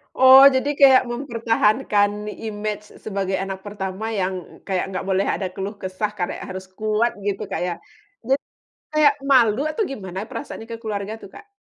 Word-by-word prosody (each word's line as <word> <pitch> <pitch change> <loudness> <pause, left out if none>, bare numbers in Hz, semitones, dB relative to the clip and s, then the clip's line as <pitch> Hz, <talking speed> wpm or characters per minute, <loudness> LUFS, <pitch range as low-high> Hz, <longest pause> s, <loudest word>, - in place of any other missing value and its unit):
Oh, 260 +1 +9
jadi 260 +2 +1
kayak 270 -2 +7
mempertahankan 230 -4 +1 0.2
image 210 -1 -4 0.2
sebagai 195 -2 -2
anak 190 0 -5
pertama 205 +1 -5
yang 185 -1 -4
kayak 185 -2 0
nggak 185 - -4
boleh 190 0 +2
ada 195 - -1
keluh 195 +2 -4
kesah 190 +2 -3
kayak 175 - -3
harus 190 0 -7
kuat 215 +2 +1
gitu 200 +1 -2
kayak 175 -1 -2 0.5
dit 270 - +4 0.6
kayak 305 -2 +5
malu 255 -3 +4
atau 310 - -1
gimana 195 -4 -6
perasaannya 230 -2 -7
ke 230 - -4
keluarga 205 -1 -3
tuh, 210 -3 -13
Kak? 410 - -14
210 Hz, 155 wpm, -22 LUFS, 190-240 Hz, 0.6 s, Oh